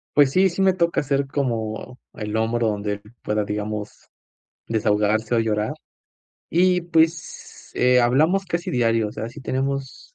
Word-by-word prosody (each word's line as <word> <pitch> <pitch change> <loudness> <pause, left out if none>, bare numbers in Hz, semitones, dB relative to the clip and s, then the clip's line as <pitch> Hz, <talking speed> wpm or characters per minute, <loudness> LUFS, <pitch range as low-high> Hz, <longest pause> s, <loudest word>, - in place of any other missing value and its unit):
Pues, 145 -2 +5
sí, 190 0 +4
sí, 180 - -5
me 190 -1 +4
toca 170 -2 +1
hacer 140 -1 0
como 120 -3 -3 0.2
el 105 -1 -4
hombro 115 +1 +1
donde 105 0 -2
él 100 - -12 0.2
pueda, 105 0 0
digamos, 105 0 -5 0.6
desahogarse 110 +1 +1
o - - +3
llorar. 105 -1 -1 0.8
Y, 180 +1 +3
pues, 165 -1 -1
eh, 125 0 +4
hablamos 155 +11 +3
casi 175 -1 -3
diario, 115 -3 +1
o - - -9
sea, 110 +2 -5
sí 145 - -11
tenemos 135 - -4
125 Hz, 155 wpm, -22 LUFS, 110-160 Hz, 0.8 s, Pues